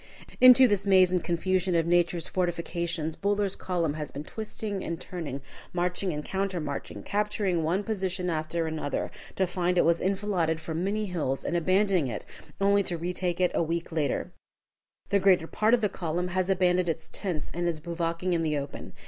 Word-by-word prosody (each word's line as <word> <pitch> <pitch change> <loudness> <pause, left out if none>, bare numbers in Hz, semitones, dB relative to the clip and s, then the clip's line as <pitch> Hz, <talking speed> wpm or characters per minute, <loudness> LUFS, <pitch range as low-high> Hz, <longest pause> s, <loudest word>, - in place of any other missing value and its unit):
Into 255 0 +9
this 205 -2 0
maze 185 -2 +6
and 180 -2 +1
confusion 185 +1 0
of 165 -1 +3
nature's 175 -1 +2
fortifications 170 -2 -2
Buller's 200 -1 0
column 170 -5 -1
has 150 -1 -5
been 145 - -6
twisting 210 +1 -5
and 165 0 -4
turning, 150 -9 -6 0.3
marching 180 +1 0
and 150 -1 -4
countermarching, 180 -7 -3
capturing 205 -4 0
one 175 +6 0
position 190 -4 -2
after 160 0 -1
another, 160 -2 -2 0.2
to 190 - +2
find 180 0 0
it - - +5
was 170 0 +3
enfiladed 190 -4 0
from 160 +1 -3
many 210 +2 0
hills, 155 -8 -2
and - - -1
abandoning 185 -2 +2
it, 120 - -5 0.3
only 200 +1 +4
to 175 -3 -2
retake 175 +1 -2
it 180 -1 +3
a - - +1
week 170 +1 -2
later. 150 -5 -1 0.8
The 200 0 +3
greater 185 -4 +4
part 215 +7 +3
of 240 - -3
the 210 - +3
column 175 -1 -2
has 185 +1 -1
abandoned 180 -1 +2
its 160 0 -3
tents 175 -7 -4
and 175 0 -1
is 165 -2 -1
bivouacking 170 +2 -2
in 170 - +1
the 155 -2 0
open. 140 0 -6
175 Hz, 180 wpm, -28 LUFS, 165-190 Hz, 0.8 s, Into